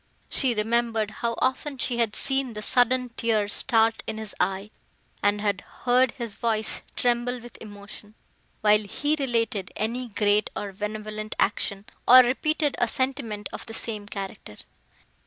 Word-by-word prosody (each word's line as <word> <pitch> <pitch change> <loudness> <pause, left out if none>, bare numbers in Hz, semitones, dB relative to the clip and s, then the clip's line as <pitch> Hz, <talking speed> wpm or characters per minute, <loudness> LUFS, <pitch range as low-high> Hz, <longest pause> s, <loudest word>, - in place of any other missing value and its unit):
She 255 -4 +1
remembered 225 0 +1
how 235 -1 0
often 265 +2 -1
she 245 -1 -1
had 225 -4 +1
seen 270 -3 0
the 210 0 -6
sudden 250 +2 +3
tear 225 -3 0
start 225 0 +2
in 220 - -3
his 220 -2 -4
eye, 195 +2 -1 0.5
and 205 0 +2
had 200 -2 0 0.2
heard 250 +1 +5
his 235 -6 -6
voice 220 -2 0
tremble 245 0 +1
with 240 0 -12
emotion, 210 0 -11 0.5
while 210 0 +5
he 290 +9 -1
related 230 -7 -1
any 240 +4 -2
great 210 -1 +2
or 200 -1 -4
benevolent 215 +1 -5
action, 200 -1 0 0.2
or 255 +1 +11
repeated 295 +3 0
a 240 - +3
sentiment 245 -5 -2
of - - -7
the 225 - -7
same 210 -3 -4
character. 195 - -7
225 Hz, 150 wpm, -26 LUFS, 210-245 Hz, 0.5 s, or